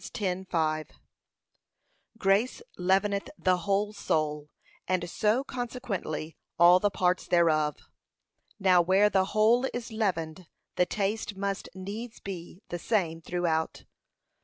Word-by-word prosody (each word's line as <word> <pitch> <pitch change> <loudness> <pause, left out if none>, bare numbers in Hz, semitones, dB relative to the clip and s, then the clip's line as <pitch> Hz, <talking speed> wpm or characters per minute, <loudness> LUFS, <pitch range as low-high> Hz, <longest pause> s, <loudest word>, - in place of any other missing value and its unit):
10:5) 180 -6 -2 1.3
Grace 200 +4 +2 0.2
leaveneth 195 +2 +1
the 185 -1 +2
whole 205 +2 +1
soul, 150 -6 -1 0.4
and 180 -1 0
so 215 +8 +1
consequently 235 - -4 0.2
all 175 +2 +7
the 205 - +2
parts 180 -1 0
thereof. 155 -4 +3 0.8
Now 185 -2 +5
where 190 +4 +4
the 190 -1 +3
whole 220 +6 +3
is 245 0 -5
leavened, 180 -6 -2 0.3
the 180 - +2
taste 205 +1 -2
must 200 0 -3
needs 215 +5 -7
be 185 0 -8
the 175 - -4
same 170 -5 0
throughout. 165 -2 -1
190 Hz, 110 wpm, -28 LUFS, 170-210 Hz, 1.3 s, all